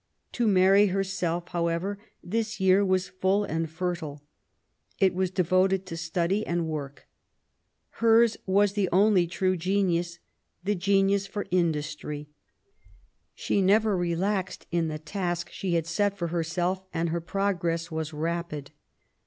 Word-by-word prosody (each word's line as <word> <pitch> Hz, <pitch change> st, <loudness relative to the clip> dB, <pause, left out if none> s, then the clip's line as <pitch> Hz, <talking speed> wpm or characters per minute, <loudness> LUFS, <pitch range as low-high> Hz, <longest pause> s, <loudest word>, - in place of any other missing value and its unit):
To 240 Hz, -2 st, 0 dB
Mary, 195 Hz, +1 st, +5 dB
herself, 185 Hz, -3 st, -2 dB
however, 175 Hz, +3 st, -1 dB, 0.2 s
this 215 Hz, +3 st, -2 dB
year 190 Hz, +1 st, +4 dB
was 185 Hz, -1 st, +1 dB
full 190 Hz, +2 st, +1 dB
and 165 Hz, -3 st, -2 dB
fertile. 160 Hz, -4 st, -4 dB, 0.7 s
It 190 Hz, -2 st, +3 dB
was 185 Hz, 0 st, 0 dB
devoted 185 Hz, +1 st, +2 dB
to 165 Hz, -, -6 dB
study 170 Hz, +5 st, -1 dB
and 170 Hz, -3 st, -1 dB
work. 145 Hz, -3 st, -6 dB, 0.9 s
Hers 230 Hz, 0 st, +5 dB
was 200 Hz, +1 st, +3 dB
the 200 Hz, -3 st, 0 dB
only 190 Hz, -1 st, +4 dB
true 185 Hz, +2 st, 0 dB
genius, 175 Hz, -1 st, 0 dB, 0.2 s
— 175 Hz, -, -36 dB
^the 205 Hz, +1 st, +1 dB
genius 195 Hz, +1 st, +2 dB
for 205 Hz, +1 st, -4 dB
industry. 150 Hz, -3 st, -1 dB, 1.1 s
She 200 Hz, -, 0 dB
never 210 Hz, +2 st, +3 dB
relaxed 185 Hz, +2 st, -1 dB
in 170 Hz, -1 st, +1 dB
the 155 Hz, -1 st, -3 dB
task 175 Hz, +1 st, -3 dB
she 180 Hz, -3 st, -2 dB
had 165 Hz, -1 st, +1 dB
set 200 Hz, +5 st, 0 dB
for 170 Hz, -2 st, -2 dB
herself, 175 Hz, +2 st, -1 dB
and 165 Hz, +1 st, -1 dB
her 170 Hz, +1 st, -2 dB
progress 175 Hz, -2 st, -1 dB
was 160 Hz, 0 st, -3 dB
rapid. 155 Hz, -2 st, -4 dB
180 Hz, 135 wpm, -27 LUFS, 170-195 Hz, 1.1 s, Mary